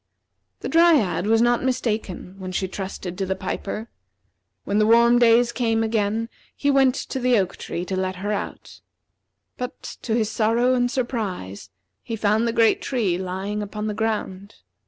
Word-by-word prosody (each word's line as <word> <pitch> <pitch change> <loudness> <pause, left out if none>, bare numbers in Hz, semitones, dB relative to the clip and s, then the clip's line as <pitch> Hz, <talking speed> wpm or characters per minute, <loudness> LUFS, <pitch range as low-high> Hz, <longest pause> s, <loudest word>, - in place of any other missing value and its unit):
The - - -3
Dryad 315 - +3
was 225 +1 +4
not 240 0 +2
mistaken 220 -8 -2
when 185 -1 -6
she 190 +1 -1
trusted 190 -1 -6
in 190 - -1
the 190 - -1
piper. 210 +3 -4 0.8
When 205 +1 0
the 215 - +3
warm 235 +1 +6
days 235 0 +5
came 225 -2 0
again 220 0 0 0.3
he 285 - +1
went 270 -2 +4
to 265 - -4
the 250 -1 +3
oak 190 -2 0
tree 175 - -5
to 190 - -3
let 185 0 -1
her 200 +3 -3
out. 210 - -5 0.8
But, 250 +1 -6 0.2
to 225 - -1
his 220 -2 0
sorrow 235 +3 +2
and 245 -1 +2
surprise, 200 - -4 0.3
he 230 - -5
found 215 +2 +1
the - - +1
great 230 -1 +3
tree 205 -10 0
lying 190 +3 -3
upon 210 +1 -5
the 215 - -1
ground. 205 -3 -3
220 Hz, 170 wpm, -23 LUFS, 195-240 Hz, 0.8 s, warm